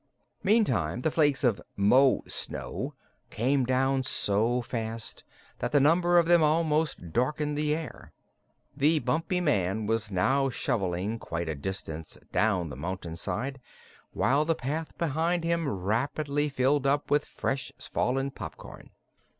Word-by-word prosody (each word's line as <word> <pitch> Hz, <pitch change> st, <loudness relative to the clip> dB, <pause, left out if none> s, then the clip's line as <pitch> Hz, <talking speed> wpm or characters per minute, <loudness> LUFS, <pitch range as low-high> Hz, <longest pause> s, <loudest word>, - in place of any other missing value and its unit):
Meantime 130 Hz, -, +2 dB
the 160 Hz, -, +1 dB
flakes 145 Hz, -3 st, +2 dB
of 120 Hz, -6 st, +2 dB
"Mo 125 Hz, +7 st, +4 dB
snow" -, -, -5 dB, 0.3 s
came 130 Hz, +4 st, +1 dB
down 130 Hz, +1 st, +2 dB
so 115 Hz, -1 st, +1 dB
fast 115 Hz, -2 st, -5 dB, 0.4 s
that -, -, -2 dB
the 145 Hz, -, +5 dB
number 175 Hz, +5 st, +4 dB
of 170 Hz, -, +5 dB
them 170 Hz, 0 st, +5 dB
almost 155 Hz, -, +1 dB
darkened 150 Hz, +4 st, 0 dB
the 150 Hz, 0 st, +1 dB
air. 160 Hz, -1 st, -8 dB, 0.6 s
The 150 Hz, +3 st, +3 dB
Bumpy 165 Hz, +6 st, 0 dB
Man 105 Hz, -, +1 dB
was 110 Hz, 0 st, 0 dB
now 135 Hz, +9 st, +2 dB
shoveling 100 Hz, -2 st, -1 dB
quite 85 Hz, -3 st, -4 dB
a 80 Hz, -, -1 dB
distance 80 Hz, 0 st, -6 dB
down 95 Hz, -7 st, +1 dB
the -, -, -6 dB
mountain 85 Hz, +3 st, -5 dB
side, 125 Hz, +10 st, -3 dB, 0.5 s
while 140 Hz, +4 st, +2 dB
the 165 Hz, +1 st, +1 dB
path 155 Hz, +4 st, -4 dB
behind 165 Hz, +2 st, 0 dB
him 170 Hz, -2 st, 0 dB
rapidly 140 Hz, +9 st, -1 dB
filled 135 Hz, +1 st, +1 dB
up 145 Hz, +1 st, 0 dB
with 145 Hz, 0 st, +4 dB
fresh 135 Hz, 0 st, -3 dB
fallen 135 Hz, +2 st, -1 dB
popcorn. -, -, -10 dB
135 Hz, 135 wpm, -28 LUFS, 105-150 Hz, 0.6 s, the